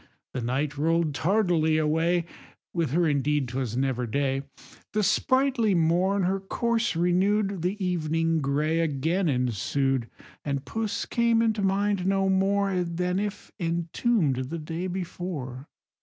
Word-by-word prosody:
The 130 - -3
night 135 +5 -2
roll'd 165 0 +1
tardily 170 -3 +2
away, 165 +3 +1 0.5
(With 165 -4 0
her 170 +5 +2
indeed 145 -1 +1
'twas 125 -2 -3
never 130 -2 0
day,) 135 +2 0 0.5
The 215 0 +1
sprightly 255 0 +2
morn 180 +4 +2
her 190 +2 +1
course 230 +2 -1
renew'd, 190 +3 +1
The 180 +4 -1
evening 165 -2 0
grey 150 +4 +1
again 165 +4 0
ensued, 125 0 0 0.3
And 140 -1 -2
puss 225 -2 -2
came 235 -1 +2
into 220 -2 +1
mind 195 -1 +1
no 195 0 +2
more 195 -1 +2
Than 180 +2 -1
if 205 0 -5
entomb'd 165 - 0
the 170 - -3
day 165 +3 -4
before. 170 -7 -5
170 Hz, 130 wpm, -26 LUFS, 145-195 Hz, 0.5 s, tardily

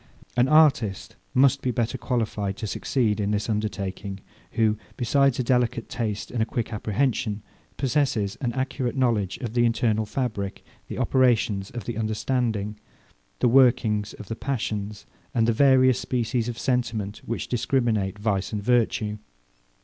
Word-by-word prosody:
An 125 +1 +4
artist 135 -10 +3 0.2
must 135 +1 +4
be 130 - -1
better 120 -1 -1
qualified 110 -5 -2
to 110 - -4
succeed 110 0 0
in 100 -1 0
this 105 0 -1
undertaking, 100 -2 -3 0.3
who, 110 -2 +2 0.2
besides 135 +2 +2
a 130 - 0
delicate 120 -2 +1
taste 105 -3 -3
and 120 - -1
a - - +3
quick 115 0 -3
apprehension, 105 0 -1 0.3
possesses 130 -7 0
an 125 -3 0
accurate 130 -1 -2
knowledge 110 -7 +1
of 115 -4 -4
the 120 0 +3
internal 115 -2 +1
fabric, 105 -5 -3 0.2
the - - -6
operations 115 -6 +2
of 120 -3 -6
the 120 -2 -4
understanding, 110 -1 -1 0.6
the 125 - +5
workings 120 -5 +3
of 105 - -10
the 115 - -4
passions, 105 -6 -3 0.3
and 115 -1 +3
the 115 - +3
various 130 0 +5
species 120 -1 -1
of 120 - -5
sentiment 115 -5 -1
which 115 - -3
discriminate 115 -5 0
vice 100 -2 -1
and 105 -2 -3
virtue. 110 -3 +1
115 Hz, 150 wpm, -25 LUFS, 105-125 Hz, 0.6 s, the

